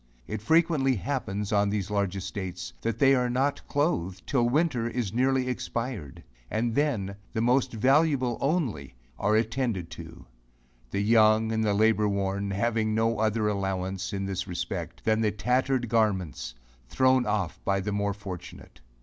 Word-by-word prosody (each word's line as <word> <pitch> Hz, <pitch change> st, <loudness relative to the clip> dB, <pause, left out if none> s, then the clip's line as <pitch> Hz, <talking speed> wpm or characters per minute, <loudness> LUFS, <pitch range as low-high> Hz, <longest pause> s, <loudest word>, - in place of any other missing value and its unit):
It 110 Hz, -, -5 dB
frequently 155 Hz, 0 st, +3 dB
happens, 105 Hz, -4 st, -3 dB
on 100 Hz, -1 st, +3 dB
these 100 Hz, -1 st, -2 dB
large 100 Hz, -2 st, 0 dB
estates, 95 Hz, -2 st, -5 dB
that 115 Hz, -1 st, -2 dB
they 135 Hz, +2 st, +5 dB
are 125 Hz, -2 st, +2 dB
not 135 Hz, +3 st, 0 dB
clothed, 95 Hz, -, -1 dB
'till 120 Hz, -4 st, +1 dB
winter 130 Hz, -5 st, +1 dB
is 120 Hz, -6 st, -3 dB
nearly 130 Hz, +1 st, +2 dB
expired; 115 Hz, -, -4 dB, 0.3 s
and 115 Hz, +1 st, -1 dB
then, 110 Hz, -9 st, 0 dB, 0.2 s
the 110 Hz, -, 0 dB
most 125 Hz, +3 st, +2 dB
valuable 130 Hz, +1 st, +2 dB
only 130 Hz, -, -1 dB, 0.2 s
are 105 Hz, +1 st, +2 dB
attended 110 Hz, -6 st, -1 dB
to; 85 Hz, 0 st, -10 dB, 0.6 s
the 100 Hz, -, -1 dB
young, 110 Hz, +1 st, +4 dB
and 110 Hz, 0 st, 0 dB
the 105 Hz, -2 st, +1 dB
labour 110 Hz, 0 st, +3 dB
worn, 100 Hz, 0 st, -1 dB
having 110 Hz, +2 st, 0 dB
no 115 Hz, +1 st, +1 dB
other 110 Hz, 0 st, +1 dB
allowance, 95 Hz, -1 st, -2 dB
in 100 Hz, -1 st, -3 dB
this 95 Hz, 0 st, -3 dB
respect, 85 Hz, -1 st, -5 dB
than 110 Hz, 0 st, +2 dB
the 110 Hz, -, +3 dB
tattered 125 Hz, +4 st, 0 dB
garments, 95 Hz, -, 0 dB, 0.3 s
thrown 130 Hz, -1 st, +3 dB
off 95 Hz, -6 st, -2 dB
by 100 Hz, 0 st, +1 dB
the 100 Hz, +2 st, -3 dB
more 100 Hz, 0 st, -1 dB
fortunate. 95 Hz, -10 st, -9 dB
110 Hz, 155 wpm, -27 LUFS, 100-125 Hz, 0.6 s, they